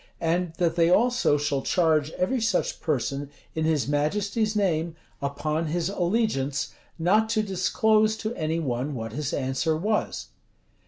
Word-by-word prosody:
And 170 +1 0
that 170 -1 0
they 165 0 +4
also 240 -5 +3
shall 145 -1 -1
charge 155 -4 +2
every 235 +7 0
such 220 -5 0
person, 140 -2 -1 0.2
in 160 0 -1
his 155 -4 +1
majesty's 205 +9 0
name, 170 -5 0 0.3
upon 150 +3 -1
his 170 +3 -1
allegiance, 175 - 0 0.2
not 210 +7 +3
to 220 -1 +1
disclose 215 +3 +2
to 220 +1 -3
any 160 -4 -1
one 135 -1 -2
what 115 -2 -5
his 145 +1 -2
answer 135 +4 0
was." 210 +6 -1
165 Hz, 145 wpm, -26 LUFS, 145-205 Hz, 0.3 s, they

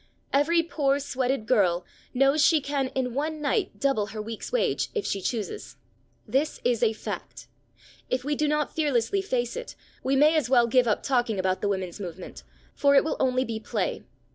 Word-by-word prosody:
Every 330 +4 +3
poor 285 -4 +1
sweated 265 -4 -1
girl 185 -8 +2 0.3
knows 275 +3 +3
she 320 - +5
can 280 -1 -1
in 250 -2 -1
one 305 +4 -2
night 300 +8 -1
double 270 -7 +1
her 220 0 -7
week's 220 +1 -6
wage - - 0
if 435 - -1
she 195 - -2
chooses. 210 -1 -4 0.5
This 270 +7 0
is 240 -2 +1
a 230 -2 +4
fact. 220 - -7 0.6
If 255 0 -1
we 295 +2 -1
do 300 +1 0
not 300 -1 0
fearlessly 295 - +1
face 245 -10 -2
it, - - -7 0.3
we 270 - +1
may 300 +4 +5
as 295 -6 +1
well 245 -2 +5
give 245 +1 +3
up 215 - +1
talking 240 -5 +1
about 185 0 0
the 205 - 0
women's 190 -1 -3
movement, 180 -2 -8 0.3
for 280 -1 +3
it 275 - +6
will 315 - -1
only 255 0 +2
be 225 -2 -4
play. 215 -3 -2
260 Hz, 190 wpm, -26 LUFS, 220-290 Hz, 0.6 s, it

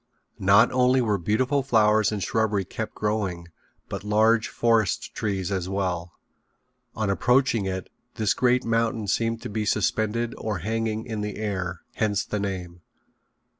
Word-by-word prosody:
Not 100 +2 +5
only 130 +1 +3
were 105 -5 +1
beautiful 125 - +1
flowers 110 -5 +3
and 105 -3 -2
shrubbery 105 -1 0
kept 110 +4 -6
growing, 100 -5 -2 0.4
but - - -5
large 110 +2 +3
forest 115 -5 +1
trees 100 -3 -2
as 95 -2 -2
well. 90 -3 -2 0.8
On 110 -1 -1
approaching 125 0 +2
it 95 -1 -4 0.3
this 110 -2 +1
great 125 0 +2
mountain 115 -1 0
seemed 115 +3 0
to - - -5
be 105 +1 -2
suspended 110 +2 0
or 110 -3 -2
hanging 110 0 -1
in 110 -3 -4
the 105 0 -4
air 95 -5 -3 0.2
hence 105 -2 0
the 105 - -3
name. 90 -3 -5
105 Hz, 145 wpm, -25 LUFS, 95-115 Hz, 0.8 s, Not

